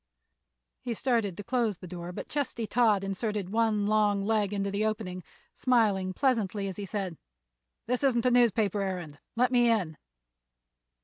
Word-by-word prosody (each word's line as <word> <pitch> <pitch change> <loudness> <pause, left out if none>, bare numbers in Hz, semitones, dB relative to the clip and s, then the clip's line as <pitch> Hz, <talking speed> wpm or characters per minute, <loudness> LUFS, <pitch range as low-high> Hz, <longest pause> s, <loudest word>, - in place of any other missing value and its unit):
He 240 -2 -3
started 225 -7 0
to 205 - -6
close 235 -4 0
the 185 - -10
door, 175 0 -6
but - - -7
Chesty 275 -5 -2
Todd 215 -3 +3
inserted 195 0 -3
one 220 -2 +2
long 205 -1 +2
leg 210 -2 +1
into 200 -1 -1
the 200 +2 -1
opening, 210 -5 -3 0.3
smiling 210 -7 +2
pleasantly 210 -4 0
as 190 - -6
he 205 - -4
said: 190 -5 -4 0.7
"This 250 +3 -1
isn't 245 -4 +2
a 250 - +4
newspaper 220 -4 +3
errand; 175 -7 -4 0.2
let 250 +2 +2
me 240 -1 +4
in." 185 -9 0
210 Hz, 160 wpm, -29 LUFS, 195-235 Hz, 0.7 s, a